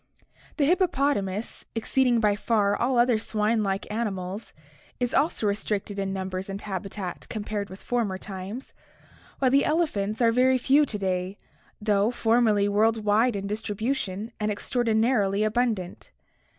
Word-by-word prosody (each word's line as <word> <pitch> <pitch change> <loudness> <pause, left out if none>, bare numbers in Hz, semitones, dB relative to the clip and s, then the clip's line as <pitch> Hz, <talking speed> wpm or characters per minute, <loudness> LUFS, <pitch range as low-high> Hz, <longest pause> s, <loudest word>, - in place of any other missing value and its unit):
The 290 - +3
hippopotamus, 275 - 0
exceeding 245 +1 +2
by 210 -2 +3
far 205 -1 +1
all 250 +1 +1
other 240 -2 +4
swine 215 +1 0
like 195 -1 -1
animals, 200 -2 -3 0.5
is 245 0 -1
also 285 -5 +1
restricted 205 0 -1
in 195 0 -1
numbers 190 0 -4
and 195 0 -4
habitat 195 -2 -6
compared 210 -2 -4
with 190 +1 -11
former 225 -6 -1
times, 195 +5 -7 0.6
while 260 -2 +2
the 275 +1 +4
elephants 225 -11 0
are 230 -2 +4
very 255 +2 +4
few 280 +4 +4
to 210 - -2
day, 185 0 -2 0.4
though 210 0 +2
formerly 225 -4 +2
world 220 +2 +2
wide 220 +3 +3
in 200 0 -3
distribution 215 0 -3
and 210 0 0
extraordinarily 220 -2 +1
abundant. 215 -5 -1
215 Hz, 135 wpm, -26 LUFS, 200-240 Hz, 0.6 s, other